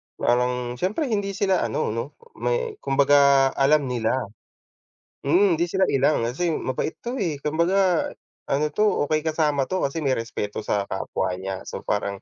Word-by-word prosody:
parang 125 +1 +2 0.3
siyempre 225 - -1
hindi 200 -2 -1
sila 190 -2 +2
ano 110 -1 -1
'no? 115 +6 -5 0.2
May 475 -3 -1
kumbaga 140 -1 +4
alam 145 +2 +3
nila. 120 -2 0 1.1
Mm, 175 +3 +4
hindi 170 - +1
sila 190 +2 +1
ilang, 135 0 +2
kasi 150 +9 -1
mabait 130 +4 -2
'to, 245 +3 -4
eh. 155 - -2
Kumbaga 175 +3 +1 0.3
ano 145 +2 0
'to, 210 +8 +1 0.2
okey 155 0 0
kasama 150 -3 +1
'to 185 0 -2
kasi 155 0 -4
may 130 - +3
respeto 110 -3 -4
sa 100 -1 -1
kapwa 95 -1 -3
niya. 95 +1 -5
So - - -6
parang, 100 -1 -2
150 Hz, 155 wpm, -24 LUFS, 125-185 Hz, 1.1 s, kumbaga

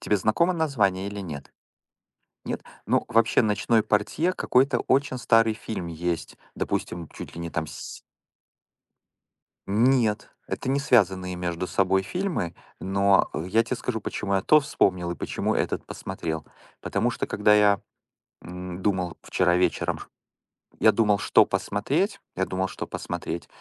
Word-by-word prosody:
Тебе 105 - +1
знакомо 110 - +2
название 110 - +1
или 100 0 -6
нет? 75 -7 -8 0.9
Нет? - - -4 0.2
Ну, - - +2
вообще, 115 +1 +4
"Ночной 110 +1 +2
портье" 110 - +1
какой-то 130 -6 +2
очень 135 -1 +1
старый 115 -2 +4
фильм 110 -5 -5
есть. 85 0 -3 0.2
Допустим, 85 -3 -3
чуть - - -10
ли 85 - -7
не 85 - -5
там 80 0 -2
с - - -8 1.7
Нет, 115 +1 +2 0.2
это 130 - -3
не 140 +1 +2
связанные 95 -8 +2
между 90 0 -3
собой 95 0 +2
фильмы, 175 - -3 0.2
но 100 +1 +3
я 95 +8 +1
тебе 115 - -3
скажу, 110 -4 -3
почему 100 -1 -3
я 95 - +2
то 155 +9 +6
вспомнил 90 -11 0
и 85 - -4
почему - - -2
этот - - -1
посмотрел. 80 -4 -5 0.4
Потому - - 0
что - - -3
когда 105 0 +3
я, 105 -2 +5 0.6
м, 90 0 -7
думал 90 -4 -1
вчера 90 -1 +2
вечером 90 - +1
ш - - -10 0.7
я - - +6
думал, 105 -3 +2
что - - +5
посмотреть, 165 - -1 0.2
я 95 - 0
думал, 95 0 -1
что - - -6
посмотреть, 85 +1 -5
100 Hz, 145 wpm, -25 LUFS, 90-115 Hz, 1.7 s, то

